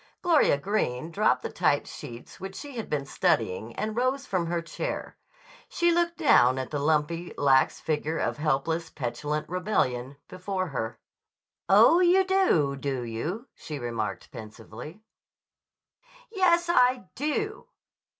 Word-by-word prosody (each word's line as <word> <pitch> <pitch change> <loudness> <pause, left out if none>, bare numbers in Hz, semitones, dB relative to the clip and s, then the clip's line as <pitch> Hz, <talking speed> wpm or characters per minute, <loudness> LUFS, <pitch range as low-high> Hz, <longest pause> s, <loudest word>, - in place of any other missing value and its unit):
Gloria 330 - +4
Greene 160 -5 -2
dropped 210 +5 +2
the - - -4
typed 150 -5 +1
sheets 120 +7 -10
which 190 0 -7
she 280 +6 -8
had 225 - -5
been 145 -2 -1
studying 110 -3 0
and 215 0 -3
rose 260 +3 0
from 180 -3 -1
her 170 0 -1
chair. 170 - -5 0.5
She 345 -1 +2
looked 340 0 +1
down 130 - +5
at 130 -1 -4
the 145 - -2
lumpy, 160 +3 0
lax 135 -2 +3
figure 155 +1 -2
of - - -1
helpless, 155 +3 -1
petulant 150 +1 -3
rebellion 140 - -1
before 185 0 -3
her. 115 -4 -4 0.7
"Oh, 225 - +7
you 365 +1 +5
do, 365 - +2
do 135 -2 -3
you?" 150 - -4
she 150 - -7
remarked 115 -4 -4
pensively. 115 - -10 1.3
"Yes; 350 -4 +3
I 250 - +3
do!" 415 - -3
170 Hz, 135 wpm, -27 LUFS, -, 1.3 s, Oh